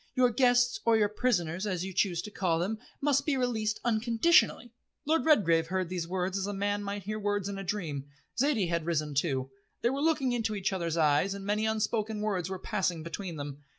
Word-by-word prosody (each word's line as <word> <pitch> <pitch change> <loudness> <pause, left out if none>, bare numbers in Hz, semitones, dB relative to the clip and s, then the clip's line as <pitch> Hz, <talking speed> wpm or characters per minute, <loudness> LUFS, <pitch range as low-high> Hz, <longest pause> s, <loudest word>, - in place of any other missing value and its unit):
Your 250 -1 +4
guests 245 0 +3
or 230 -1 +4
your 210 -1 +3
prisoners, 190 -5 0
as 185 -2 -2
you 190 - -6
choose 175 -3 +1
to 210 - -8
call 180 -5 0
them, 200 +6 -2 0.2
must 280 -1 +2
be 295 -3 0
released 220 -4 -1
unconditionally." 235 +3 +3 0.3
Lord 320 +2 +2
Redgrave 170 - +4
heard 185 0 -1
these 175 -2 -3
words 185 +1 -1
as 195 - -2
a 205 - -3
man 205 +1 -1
might 200 0 -4
hear 215 +3 -4
words 205 -1 -1
in 200 -1 -4
a - - -5
dream. 165 -8 -3 0.3
Zaidie 240 - +1
had 170 -1 -1
risen 155 -3 -1
too. 135 -3 -1 0.3
They 235 - +3
were 275 +1 -2
looking 300 -5 +2
into 225 -3 -1
each 195 -1 -1
other's 170 -3 -2
eyes, 155 +5 +3
and 195 -1 -7
many 210 +2 0
unspoken 220 0 -1
words 190 -5 -1
were 190 - -3
passing 180 -3 -2
between 170 +1 -5
them. 145 -1 -7
200 Hz, 210 wpm, -30 LUFS, 175-225 Hz, 0.3 s, Your